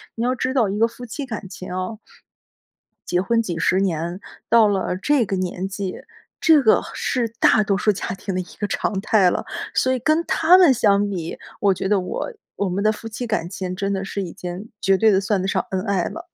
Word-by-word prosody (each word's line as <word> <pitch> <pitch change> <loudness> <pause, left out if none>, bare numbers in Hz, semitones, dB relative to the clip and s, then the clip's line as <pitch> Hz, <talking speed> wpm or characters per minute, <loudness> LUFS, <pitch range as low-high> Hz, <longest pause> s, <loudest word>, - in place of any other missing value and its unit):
你 230 - -2
要 255 +1 +1
知 255 +1 -1
道 235 -6 +3
一 200 - -2
个 230 - +5
夫 245 +1 -10
妻 275 +4 -5
感 220 -5 -6
情 185 -2 -8
哦 185 +4 -4 1.1
结 180 0 +1
婚 230 +3 +1
几 175 -7 -4
十 185 +3 +2
年， 175 -1 -1 0.3
到 230 -2 +6
了 190 -2 -1
这 270 +2 +2
个 195 0 -2
年 185 0 -3
纪， 195 -2 -4 0.5
这 315 -4 +6
个 220 - +4
是 240 -3 -1
大 215 - +5
多 200 -1 +1
数 210 - +1
家 - - -5
庭 190 0 -5
的 185 - 0
一 - - -6 0.2
个 205 - -1
常 195 -1 -1
态 195 -2 +3
了。 - - -3 0.3
所 260 0 +2
以 - - 0
跟 310 +7 +1
他 350 +3 +5
们 345 -8 +6
相 205 -3 +2
比， 170 -4 -4 0.2
我 200 -2 +4
觉 190 - -3
得 200 -2 +2
我 470 - -4 0.2
我 200 - 0
们 195 +3 -1
的 215 - +4
夫 225 +1 -7
妻 225 +3 -5
感 210 -7 -2
情， 185 -1 -4
真 200 +1 -2
的 190 0 -2
是 200 +1 -4
已 175 -3 -6
经 180 +4 -7
绝 195 -1 +3
对 220 +1 +4
的 195 -1 +3
算 195 -1 0
得 190 - -2
上 - - 0
恩 185 -1 -1
爱 195 -4 +1
了。 345 +2 -9
200 Hz, 250 characters per minute, -22 LUFS, 190-230 Hz, 1.1 s, 到